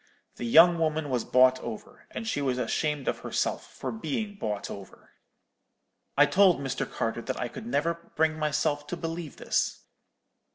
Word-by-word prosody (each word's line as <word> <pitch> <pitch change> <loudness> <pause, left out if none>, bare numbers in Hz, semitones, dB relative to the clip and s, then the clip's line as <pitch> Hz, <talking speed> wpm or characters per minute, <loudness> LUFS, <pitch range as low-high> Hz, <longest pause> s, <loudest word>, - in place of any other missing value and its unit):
The 120 - -4
young 170 +7 +7
woman 155 -2 0
was 125 -2 0
bought 130 0 +5
over, 115 -3 -9
and 225 - -6
she 145 - -1
was 130 -3 0
ashamed 150 +1 -1
of - - 0
herself - - -2
for - - -5
being 220 -1 -3
bought 105 - -4
over.' 100 -2 -11 1.1
"I 145 - +8
told 180 +2 +4
Mr. 135 -2 -3
Carter 115 +1 -2
that 130 +2 -4
I 125 - -1
could 215 - -9
never 170 -7 -1
bring 155 0 +1
myself 150 -1 0
to 175 - -4
believe 165 -2 -5
this. - - -1
150 Hz, 165 wpm, -28 LUFS, 130-170 Hz, 1.1 s, I